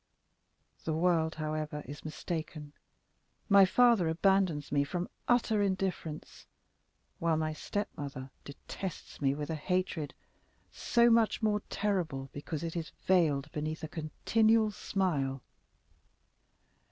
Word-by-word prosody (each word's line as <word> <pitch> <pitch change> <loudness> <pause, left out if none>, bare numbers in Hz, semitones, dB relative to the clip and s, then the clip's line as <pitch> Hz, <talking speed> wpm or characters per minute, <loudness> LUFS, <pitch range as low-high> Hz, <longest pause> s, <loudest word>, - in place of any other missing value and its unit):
The 160 - -1
world, 165 -1 +2
however, 155 -1 -3
is 145 +1 -9
mistaken; 155 -2 -5 0.7
my 200 -2 +8
father 230 -4 +4
abandons 175 -3 +2
me 140 0 +3
from 175 +5 -3 0.2
utter 230 -3 +3
indifference, 185 -5 -3 0.7
while 165 -1 +2
my 155 0 -1
stepmother 145 -7 -5
detests 160 +5 -7
me 135 0 +2
with 150 +2 -4
a - - -1
hatred 165 -2 -2 0.6
so 235 0 +3
much 230 -1 +3
the - - +1
more 210 -1 +2
terrible 165 -10 -1
because 150 +2 -5
it 165 0 -4
is 165 -2 -4
veiled 155 -6 +3
beneath 155 +2 -4
a - - -2
continual 215 +8 +2
smile." 150 - -1
160 Hz, 115 wpm, -31 LUFS, 150-195 Hz, 0.7 s, my